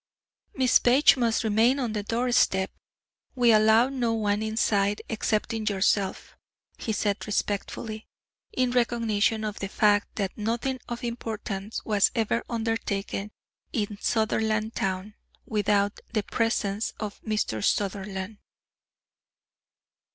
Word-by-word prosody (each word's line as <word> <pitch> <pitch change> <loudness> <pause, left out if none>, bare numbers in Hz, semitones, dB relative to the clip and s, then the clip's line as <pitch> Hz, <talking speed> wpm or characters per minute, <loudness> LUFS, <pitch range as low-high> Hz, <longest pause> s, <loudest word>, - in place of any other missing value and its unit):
"Miss 260 -3 +4
Page 255 +4 +5
must 235 -3 +1
remain 225 +5 +3
on 245 -5 -2
the 210 - -1
doorstep. 230 -4 +1 0.6
We 245 -2 +5
allow 220 +3 +5
no 240 -4 0
one 210 -1 0
inside 210 -2 +1
excepting 220 0 -1
yourself," 195 -1 0 0.4
he 225 - -2
said 205 0 -1
respectfully, 215 +1 -3 0.4
in 255 -1 +1
recognition 230 -3 +1
of 210 -1 -4
the 195 - -3
fact 205 0 +2
that 195 -3 -2
nothing 235 +4 -2
of 240 +1 -5
importance 220 -3 -4
was 210 -3 +3
ever 225 +1 0
undertaken 220 -3 -2 0.4
in 205 -2 -2
Sutherlandtown 215 -3 0 0.3
without 205 -1 +1
the 215 -3 +1
presence 220 -2 -1
of 210 -2 -6
Mr. 210 - -2
Sutherland. 200 0 -2
215 Hz, 110 wpm, -26 LUFS, 205-230 Hz, 0.6 s, Page